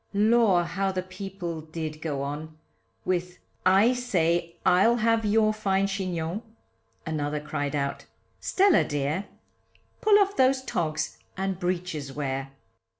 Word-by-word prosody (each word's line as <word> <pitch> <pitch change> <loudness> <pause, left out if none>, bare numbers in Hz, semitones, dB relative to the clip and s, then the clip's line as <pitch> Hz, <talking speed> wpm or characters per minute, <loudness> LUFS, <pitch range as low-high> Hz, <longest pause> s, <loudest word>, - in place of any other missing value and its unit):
Lor! 210 -3 +4
how 195 +3 -1
the 185 -1 -2
people 185 -3 -6
did 155 -1 -6
go 145 -4 -2
on, 155 +2 -6 0.5
With, 180 0 -1 0.3
I 200 +6 +5
say 170 -8 0
I'll 190 +6 +5
have 230 -1 +2
your 215 +1 +3
fine 195 -2 +1
chignon, 185 -1 -2 0.6
Another 150 -1 -2
cried 145 -1 -3
out, 140 -1 -2 0.3
Stella 385 -2 +4
dear, 145 +7 -2 0.7
Pull 425 -1 +6
off 400 -1 +2
those 260 0 +3
togs, 155 -9 -2 0.2
and 190 -1 -2
breeches 175 -6 -2
wear. 135 -1 -3
180 Hz, 125 wpm, -27 LUFS, 155-210 Hz, 0.7 s, Pull